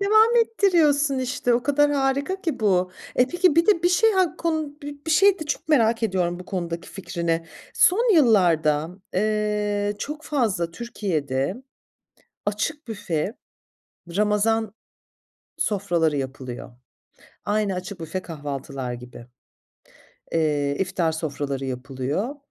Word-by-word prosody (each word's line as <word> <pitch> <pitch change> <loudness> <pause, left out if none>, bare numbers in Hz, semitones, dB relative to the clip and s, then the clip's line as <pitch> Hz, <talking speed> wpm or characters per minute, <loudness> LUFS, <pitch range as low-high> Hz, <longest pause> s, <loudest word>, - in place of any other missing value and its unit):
devam 435 +4 +5
ettiriyorsun 305 -11 +2
işte. 255 -1 0
O 240 - +1
kadar 290 +1 +3
harika 280 +7 0
ki 325 - -3
bu. 185 -3 +2 0.3
Eee, 250 - +6
peki 355 -3 +3
bir 335 - +4
de 400 -6 +4
bir 350 - +4
şey, 440 +5 +4
hak 370 -3 +1
kun 315 -3 -2 0.3
bir - - -1
şey 390 +3 +5
de - - -3
çok 295 - -3
merak 230 -6 +3
ediyorum 180 -4 0
bu 180 - -9
konudaki 170 -3 -4
fikrini. 170 -3 -3 0.3
Son 450 +3 +4
yıllarda, 170 - +4 0.2
eee, 210 0 0
çok 300 +1 -5
fazla 215 - 0
Türkiye'de 175 - -2 0.8
açık 250 +9 -2
büfe 195 -3 -2 0.8
ramazan 215 +1 +1 0.8
sofraları 175 -7 +1
yapılıyor. 130 -2 -5 0.8
Aynı 205 -2 +1
açık 185 0 -6
büfe 165 +3 -4
kahvaltılar 140 -5 -5
gibi, 120 0 -10 1.1
eee, 145 -3 +1
iftar 185 -3 0
sofraları 145 -4 -3
yapılıyor. 135 - -3
205 Hz, 120 wpm, -24 LUFS, -, 1.1 s, Eee